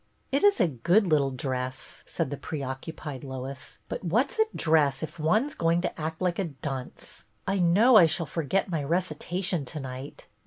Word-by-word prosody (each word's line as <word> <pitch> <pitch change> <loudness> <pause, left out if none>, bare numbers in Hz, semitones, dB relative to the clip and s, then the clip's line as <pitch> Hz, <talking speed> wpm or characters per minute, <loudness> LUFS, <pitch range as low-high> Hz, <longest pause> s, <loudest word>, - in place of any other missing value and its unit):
" - - -41
It 275 +5 +1
is 410 -1 +5
a 180 - +4
good 170 - +2
little 150 -5 +3
dress," 130 0 -4
said 130 - -2
the - - -1
preoc 135 +1 -5
cupied 150 -4 -7
Lois, 130 0 -7
" - - -41
but - - -5
what 225 - +1
's - - -10
a 440 - +6
dress 150 -4 +2
if 160 +1 -6
one 180 - +2
's 295 - -6
going 165 +1 +1
to 175 - -4
act 160 +1 -3
like 180 0 0
a 195 - +1
dunce? 135 -4 -7 0.2
I 195 0 0
know 205 +8 +6
I 175 -5 +8
shall 165 +2 -1
forget 165 +5 -1
my 165 -5 -2
recitation 175 +1 -1
to 150 +4 -5
night." 130 +1 -7
160 Hz, 205 wpm, -27 LUFS, 135-180 Hz, 0.2 s, I